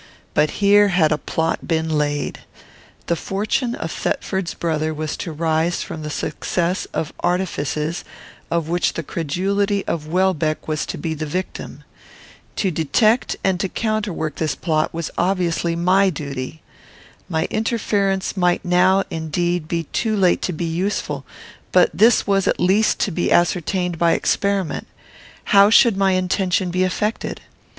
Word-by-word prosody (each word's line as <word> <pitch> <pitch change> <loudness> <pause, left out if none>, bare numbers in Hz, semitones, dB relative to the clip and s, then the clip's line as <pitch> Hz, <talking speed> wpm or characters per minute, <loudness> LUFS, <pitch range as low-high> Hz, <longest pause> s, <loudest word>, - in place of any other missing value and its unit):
But 150 - +3 0.2
here 205 +1 +6
had 175 -5 +3
a 150 - +2
plot 160 0 -2
been 160 -1 0
laid. 145 -2 -1 0.7
The 170 - +1
fortune 215 - -1
of - - -5
Thetford's 190 -3 -2
brother 155 -1 -1
was 155 0 -3
to 170 - -5
rise 160 +2 0
from 160 - -7
the 150 - -5
success 175 +4 -2
of 155 - -3
artifices 165 -3 -1 0.5
of 170 -2 0
which 175 +1 +1
the 165 - -4
credulity 195 +7 -1
of 155 -2 -3
Welbeck 165 -3 0
was 155 -1 -2
to - - -4
be 165 -2 -3
the 155 0 -4
victim. 185 +5 -5 0.7
To 190 - 0
detect 175 - +2
and 190 -2 +1
to 195 - -1
counterwork 210 -9 -2
this 155 -2 -1
plot 155 -2 0
was 165 -1 -4
obviously 170 -2 0
my 185 +3 +3
duty. 145 -2 -6 0.7
My 160 -2 0
interference 205 -4 0
might 180 0 +1
now 185 +2 +4
indeed 165 +1 -1
be 165 0 -1
too 220 -2 0
late 185 -3 +3
to - - -1
be 170 +1 -3
useful; 180 +5 -2 0.5
but - - +5
this 230 +2 +4
was 195 -1 +1
at - - +1
least 200 +4 +3
to 200 - +1
be 175 +1 -1
ascertained 180 0 +1
by 170 -1 +4
experiment. 200 -3 0 0.6
How 200 0 +6
should 230 -1 +6
my 195 -1 +2
intention 185 0 0
be 185 +1 +1
effected? 210 +4 -2
175 Hz, 150 wpm, -21 LUFS, 160-195 Hz, 0.7 s, here